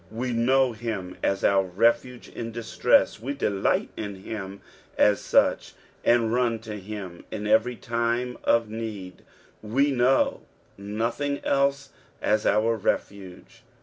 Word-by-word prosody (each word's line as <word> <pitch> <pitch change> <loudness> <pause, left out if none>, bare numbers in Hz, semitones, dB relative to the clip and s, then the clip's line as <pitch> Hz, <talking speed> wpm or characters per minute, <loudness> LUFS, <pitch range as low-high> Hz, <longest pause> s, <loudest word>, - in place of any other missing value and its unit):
We 120 +3 -3
know 130 +2 +3
him 110 -5 -5
ss 100 0 0
our 100 -1 +4
refuge 115 +6 0
iu 115 - -4
distress, 115 -2 +2
we 135 +4 -3
delight 100 -7 0
in 100 -2 -5
him 95 0 -7 0.4
as 105 -1 +4
such, - - +2 0.3
and 115 -1 +3
run 120 -2 +1
to 110 -2 -7
him 95 -3 -8
in 105 -1 -5
every 110 +3 +3
time 120 +2 -2
of 115 -1 +3
need. 105 -5 -7 0.4
We 135 +7 +1
know 130 +1 +2 0.3
nothing 115 +8 -2
else 140 0 +1 0.3
as 105 0 +1
our 110 +3 +3
refuge. 95 -2 -4
115 Hz, 130 wpm, -25 LUFS, 105-120 Hz, 0.4 s, our